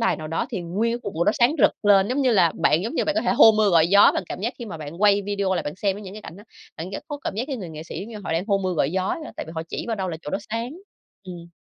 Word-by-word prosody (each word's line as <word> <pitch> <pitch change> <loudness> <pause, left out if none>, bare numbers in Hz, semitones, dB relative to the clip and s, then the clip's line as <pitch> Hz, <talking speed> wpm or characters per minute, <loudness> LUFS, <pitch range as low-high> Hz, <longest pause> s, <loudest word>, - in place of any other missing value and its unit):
đài 230 - +1
nào 155 0 -7
đó 165 - -2
thì 215 -7 -3
nguyên 195 +7 -1
cái 240 - -2
cục 200 - -6
màu 170 +2 0
đó - - +3
sáng 245 +5 +4
rực - - +5
lên, 200 -1 +5
giống 275 +3 0
như 255 - +3
là, 175 -6 +4
bạn 165 0 +3
giống 230 +9 -4
như - - +1
bạn 305 - 0
có 325 - +1
thể 240 - +1
hô 225 - +7
mưa 215 -1 +3
gọi 165 -2 +5
gió, 200 +2 +7
bạn - - -1
cảm - - -6
giác 230 +5 -2
khi 240 - -6
mà 205 -7 -7
bạn 155 +4 -8
quay 205 -1 +5
video 200 -1 -1
lại 175 - -1
bạn 145 - -5
xem 195 0 -1
với 210 - -9
những 190 -1 -9
cái 215 - -9
cảnh 165 - -10
đó, 205 - -13 0.3
bạn 170 +4 -6
rất - - -6
có 290 -2 -5
cảm - - -3
giác 225 +4 -2
cái 275 -3 -4
người 185 -6 -7
nghệ 155 0 -8
sĩ 165 - -7
giống 205 - -7
như 230 - -8
họ - - -2
đang 165 +3 0
hô 200 -2 +2
mưa 185 -1 -2
gọi 140 -2 +1
gió 190 +1 -1
vậy 320 - -3
đó, - - -8
tại - - -5
vì 160 - -9
họ 160 - -3
chỉ - - -4
vào 230 -2 -2
đâu 190 -2 -3
là 165 - -4
chỗ 150 - -6
đó - - -1
sáng, 230 +2 -3 0.5
ừm. 175 -3 -9
195 Hz, 365 wpm, -23 LUFS, 170-225 Hz, 0.5 s, hô